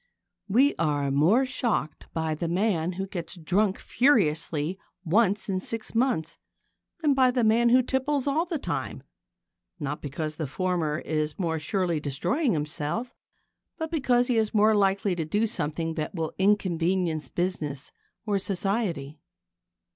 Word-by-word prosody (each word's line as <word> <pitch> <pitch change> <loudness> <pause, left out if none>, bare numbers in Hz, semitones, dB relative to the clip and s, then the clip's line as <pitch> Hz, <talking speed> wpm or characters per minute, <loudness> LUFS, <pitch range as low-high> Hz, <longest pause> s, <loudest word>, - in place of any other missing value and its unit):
We 255 +8 +4
are 145 -3 +1
more 175 - +4
shocked 235 - -2
by 160 -1 -1
the 165 +2 -3
man 180 -1 0
who 190 +2 -3
gets 180 -3 -6
drunk 190 +4 +1
furiously 170 - +1 0.3
once 205 +3 +2
in 190 -2 0
six 225 +3 -4
months 225 - 0 0.6
than 300 -3 +3
by 260 -1 +4
the 250 -1 +1
man 230 +2 +4
who 255 +2 +5
tipples 265 +2 0
all 310 +5 +1
the 335 -2 -2
time, - - -4 0.8
not 145 -1 -4
because 155 +2 -4
the 155 - -2
former 170 -1 -1
is 155 -1 -2
more 165 -4 -1
surely 175 0 0
destroying 175 - 0
himself, 155 +9 -3 0.6
but 320 -1 -4
because 250 -6 +2
he 245 -2 +1
is 220 0 +1
more 215 +1 +5
likely 195 -1 +2
to 165 - -2
do 205 +8 +1
something 165 -4 -2
that 155 +2 -4
will 160 -2 -3
inconvenience 180 -4 +1
business 155 -6 -3 0.3
or 205 -2 +1
society. 180 -7 -2
185 Hz, 145 wpm, -27 LUFS, 160-230 Hz, 0.8 s, who